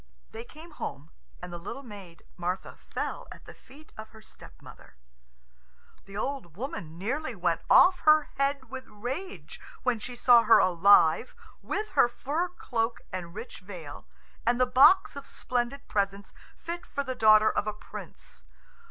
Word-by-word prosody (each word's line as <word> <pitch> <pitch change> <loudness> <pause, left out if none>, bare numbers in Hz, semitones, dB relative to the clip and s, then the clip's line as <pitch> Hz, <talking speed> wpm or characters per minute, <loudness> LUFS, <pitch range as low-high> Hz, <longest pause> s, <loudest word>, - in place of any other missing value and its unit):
They 225 - -8
came 315 +7 -14
home, 155 - -7 0.3
and 180 -1 -7
the 175 - -6
little 275 +10 -7
maid, 200 -8 -12
Martha, 180 +1 -4
fell - - -6
at - - -13
the - - -11
feet 290 +4 -18
of 215 0 -8
her 220 - -16
stepmother. - - -15 1.1
The 195 +1 -9
old 240 - -4
woman 175 - -6
nearly 255 - -3
went 175 -3 0
off 370 0 +6
her 305 -1 +4
head 275 -2 -1
with 265 -1 -7
rage 265 - -7 0.2
when 250 -3 +1
she 245 +3 -8
saw 240 -1 +6
her 230 0 +6
alive, 185 0 +4 0.3
with 425 +2 -3
her - - +4
fur 290 +8 -2
cloak 235 -9 -3
and 175 -1 -6
rich 225 +4 -8
veil, 175 -7 -10 0.4
and 240 +1 +1
the 255 - +5
box 360 +11 +5
of 280 -1 -8
splendid 250 +3 -3
presents 200 -1 -2 0.2
fit 345 +1 -6
for 280 - -4
the 260 -1 -4
daughter 215 -2 +5
of 210 - -2
a - - 0
prince. 210 - -12
235 Hz, 160 wpm, -28 LUFS, 195-275 Hz, 1.1 s, off